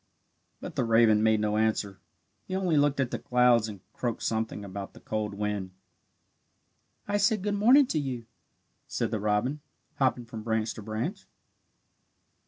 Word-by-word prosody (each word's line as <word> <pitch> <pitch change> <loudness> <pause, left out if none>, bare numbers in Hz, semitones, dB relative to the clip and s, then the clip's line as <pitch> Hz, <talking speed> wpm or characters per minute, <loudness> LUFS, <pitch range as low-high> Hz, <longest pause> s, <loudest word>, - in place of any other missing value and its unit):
But - - -8
the - - +1
raven 115 -2 +4
made 110 -1 +3
no 105 0 0
answer; 110 -3 0 0.5
he 185 - -3
only 185 -4 +1
looked 145 -1 +3
at 130 -3 0
the - - -3
clouds 125 -3 +3
and 100 -3 -9
croaked 120 -2 -3
something 110 -2 -2
about 100 0 -7
the - - -12
cold 105 -2 -3
wind. 100 -2 -3 1.3
"I 205 0 +1
said 205 0 +2
good 205 0 0
morning 245 +8 +6
to 165 -11 -1
you," 130 -5 -4 0.6
said - - -2
the 110 - -1
robin, 110 +8 0 0.4
hopping 125 -3 +1
from 115 -1 -8
branch 110 0 -1
to - - -9
branch. 110 - -4
115 Hz, 160 wpm, -28 LUFS, 105-140 Hz, 1.3 s, morning